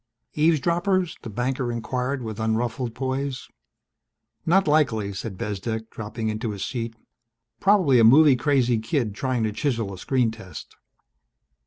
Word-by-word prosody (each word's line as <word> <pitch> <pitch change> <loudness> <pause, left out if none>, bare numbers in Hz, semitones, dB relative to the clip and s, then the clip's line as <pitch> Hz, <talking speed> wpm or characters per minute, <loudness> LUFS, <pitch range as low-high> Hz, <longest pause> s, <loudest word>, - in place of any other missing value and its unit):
"Eavesdroppers?" 170 +4 +1
the 115 - -7
banker 125 +3 -2
inquired 125 +3 -2
with 110 -1 -6
unruffled 115 +2 -1
poise. 135 +1 -3 1.0
"Not 190 +2 +4
likely," 115 -10 +2
said 95 0 -6
Bezdek, 110 +3 -4
dropping 110 +1 -5
into 110 +1 -2
his 100 -2 -4
seat. 115 -2 -4 0.6
"Probably 185 -11 +4
a - - +6
movie 140 +5 +7
crazy 125 -3 +2
kid 110 -1 -1
trying 125 +1 -1
to 110 - 0
chisel 115 -7 -1
a 95 - -9
screen 125 0 +1
test." 95 -9 -10
120 Hz, 135 wpm, -24 LUFS, 110-140 Hz, 1.0 s, movie